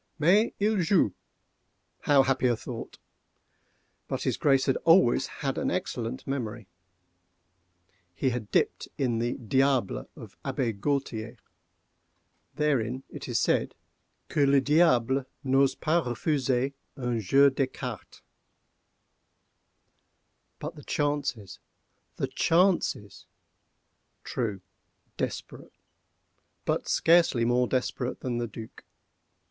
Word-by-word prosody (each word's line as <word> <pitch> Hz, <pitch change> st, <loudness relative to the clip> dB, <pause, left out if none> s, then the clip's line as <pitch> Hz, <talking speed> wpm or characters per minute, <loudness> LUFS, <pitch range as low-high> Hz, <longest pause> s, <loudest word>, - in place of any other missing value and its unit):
Mais 185 Hz, +9 st, +4 dB
il 210 Hz, -1 st, +2 dB
joue!—how 145 Hz, -, -1 dB
happy 130 Hz, -1 st, +1 dB
a 120 Hz, -, +2 dB
thought!—but -, -, -11 dB
his -, -, 0 dB
Grace 135 Hz, -2 st, +3 dB
had 135 Hz, -, +2 dB
always 165 Hz, -7 st, +4 dB
an 135 Hz, -1 st, -1 dB
excellent 125 Hz, -8 st, -3 dB
memory. 120 Hz, -6 st, -4 dB, 1.5 s
He 130 Hz, -, 0 dB
had 115 Hz, -4 st, -4 dB
dipped -, -, 0 dB
in 120 Hz, -4 st, 0 dB
the 120 Hz, +1 st, 0 dB
"Diable" 125 Hz, -, 0 dB
of -, -, -12 dB
Abbé 120 Hz, -4 st, -1 dB
Gualtier. 120 Hz, -3 st, -2 dB, 1.2 s
Therein 130 Hz, -4 st, 0 dB
it -, -, -8 dB
is -, -, +1 dB
said -, -, +1 dB, 0.5 s
"que 145 Hz, -2 st, +2 dB
le 140 Hz, 0 st, +5 dB
Diable 135 Hz, -3 st, +3 dB, 0.2 s
n'ose 135 Hz, 0 st, +3 dB
pas 165 Hz, +2 st, +1 dB
refuser 130 Hz, 0 st, 0 dB, 0.3 s
un 125 Hz, -3 st, -1 dB
jeu 135 Hz, +8 st, +5 dB
d'écarté." 130 Hz, -4 st, -4 dB, 2.4 s
But -, -, -6 dB
the -, -, -12 dB
chances—the 140 Hz, -9 st, -4 dB
chances! 170 Hz, -, +1 dB, 1.0 s
True—desperate: 100 Hz, -6 st, -6 dB, 0.9 s
but -, -, -1 dB
scarcely 165 Hz, -8 st, +4 dB
more 125 Hz, +1 st, +2 dB
desperate 125 Hz, 0 st, -2 dB
than 120 Hz, -2 st, -2 dB
the 120 Hz, -, -2 dB
Duc. 110 Hz, +1 st, -10 dB
130 Hz, 95 wpm, -28 LUFS, 120-145 Hz, 2.4 s, le